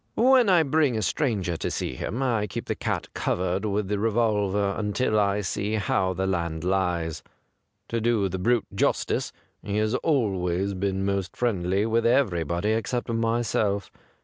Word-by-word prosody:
When 250 -2 +5
I 175 -3 +5
bring 145 -4 +2
a 110 - -1
stranger 100 - 0
to - - -2
see - - -3
him 115 - -3
I 115 -5 +1
keep 90 - -5
the - - -1
cat - - -3
covered 90 +3 -1
with 105 -1 -1
the 105 0 -1
revolver 105 -3 +1
until 110 +1 0
I 100 0 +1
see 105 +3 -2
how 95 -2 0
the 95 +1 -2
land 85 -4 -2
lies. 90 -4 0 0.7
To 115 -1 -1
do 115 -3 +2
the 95 0 -4
brute 120 +3 +2
justice, - - 0 0.3
he 105 0 -3
has 110 +1 +1
always 100 - 0
been 95 0 -1
most 100 -2 -2
friendly 100 -4 0
with 115 +1 +2
everybody 90 - +1
except 115 +3 -1
myself. 115 -3 0
105 Hz, 160 wpm, -26 LUFS, 95-115 Hz, 0.7 s, When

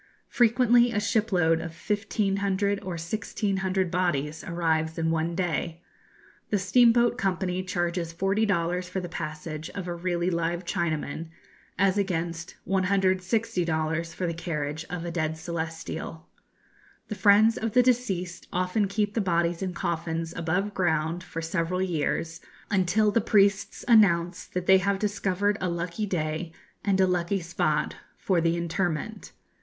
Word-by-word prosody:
Frequently 240 0 +4
a 215 - 0
shipload 200 -7 +2
of 165 0 -7
1,500 200 -1 0
or 185 - -5
1,600 190 +1 -1
bodies 155 -4 -1
arrives 160 -2 0
in 165 0 +1
one 165 +1 -1
day. 170 -1 -2 0.7
The 210 - +2
Steamboat 240 +5 +4
Company 185 -2 0
charges 175 -2 -2
40 195 +5 +1
dollars 180 -1 0
for 190 - -2
the 180 - -5
passage 155 -1 -5
of 190 -2 -4
a 175 - -2
really 175 0 -1
live 170 +1 -1
Chinaman, 160 -2 -2 0.5
as 195 +2 +3
against 170 -3 -2
160 190 +2 +1
dollars 160 0 -1
for 185 - -2
the 170 - -1
carriage 155 -2 -3
of 175 -1 -4
a 170 - -3
dead 160 -2 -1
celestial. 160 -1 -5 0.8
The - - -4
friends 210 +3 +5
of 220 -1 -3
the 250 - +6
deceased 195 -9 -1
often 185 +3 +1
keep 205 +1 -1
the 225 - +1
bodies 170 -2 0
in 185 -2 -3
coffins 165 0 -2
above 180 +5 -1
ground 165 -1 0
for 165 - -6
several 165 +2 -1
years, 165 -2 -1 0.3
until 205 +2 +3
the 230 - +2
priests 200 -2 +2
announce 180 -7 +4
that 180 0 -4
they 190 0 +6
have 200 +1 +1
discovered 205 0 0
a 185 - 0
lucky 170 +5 -3
day 160 -2 -2 0.3
and 195 -1 +1
a 190 - +6
lucky 180 +1 0
spot 155 -3 -1 0.2
for 180 -3 +1
the 165 +1 +1
interment. 175 +4 -2
180 Hz, 145 wpm, -27 LUFS, 165-200 Hz, 0.8 s, the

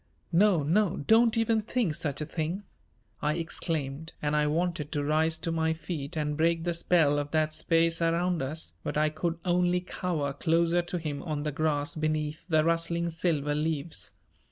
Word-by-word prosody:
"No, 180 -2 +4
no, 180 +6 +2
don't 225 +8 +4
even 225 -1 +2
think 220 -5 0
such 150 -3 -2
a - - -1
thing," 165 +6 -3 0.6
I 150 +1 +1
exclaimed, 160 -2 -3
and 150 0 0
I 150 0 +3
wanted 160 -1 -1
to 145 -2 0
rise 160 +2 +2
to 165 - -3
my 160 0 +1
feet 160 -1 -5
and 150 -1 -1
break 165 +1 +2
the 175 0 0
spell 165 -4 +3
of 145 0 -3
that 155 0 +1
space 165 +1 +2
around 170 0 +1
us, 135 - -4
but - - -3
I 155 0 +3
could 165 +2 -2
only 180 0 +2
cower 165 -6 -2
closer 170 +3 +2
to 175 +1 -4
him 150 -4 -4
on 150 -3 -3
the 150 - -1
grass 150 0 0
beneath 155 0 -2
the 155 -2 +4
rustling 170 +1 0
silver 155 -3 0
leaves. 155 +1 -3
160 Hz, 180 wpm, -28 LUFS, 150-170 Hz, 0.6 s, No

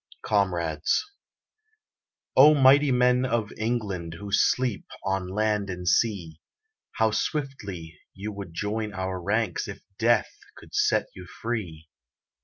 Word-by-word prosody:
COMRADES 85 - 0 1.3
O 150 +3 +8
mighty 140 +1 +6
men 125 0 +3
of 115 -4 -1
England 105 -7 -3
Who 100 +3 -8
sleep 120 +2 +2 0.2
on 95 -1 -1
land 105 +1 0
and 90 -1 -5
sea, 90 -6 +1 0.5
How 110 0 +2
swiftly 100 - -4 0.2
you 100 +2 -5
would 100 -3 -8
join 105 +4 -3
our 95 -1 -3
ranks 100 0 -1
If - - -9 0.2
Death 115 -2 +2 0.2
could - - -15
set - - +2
you 90 -1 -11
free! 90 -9 -5
105 Hz, 120 wpm, -26 LUFS, 90-115 Hz, 1.3 s, O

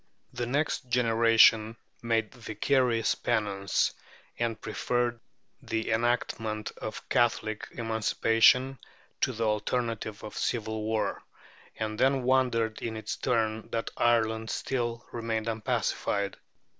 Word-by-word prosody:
The 120 0 -3
next 140 -1 -1
generation 115 -2 +4 0.2
made 115 -1 0
vicarious 120 0 +1
penance, 100 -4 0 0.5
and 115 -1 -1
preferred 120 -1 -1 0.4
the 110 0 -2
enactment 110 -2 -1
of 110 - -6
Catholic 110 -3 +1
emancipation 115 +3 +3 0.4
to 130 - +1
the 115 -1 -3
alternative 110 0 -2
of 105 - -8
civil 110 -2 -2
war; 110 0 -1 0.5
and 110 0 -4
then 135 0 +3
wondered 125 -4 +1
in 110 -1 -3
its 110 - -4
turn 110 -2 -1
that 115 - -3
Ireland 110 -1 +2
still 120 -3 -2
remained 115 -1 -2
unpacified. 105 -2 -1
115 Hz, 105 wpm, -29 LUFS, 110-120 Hz, 0.5 s, generation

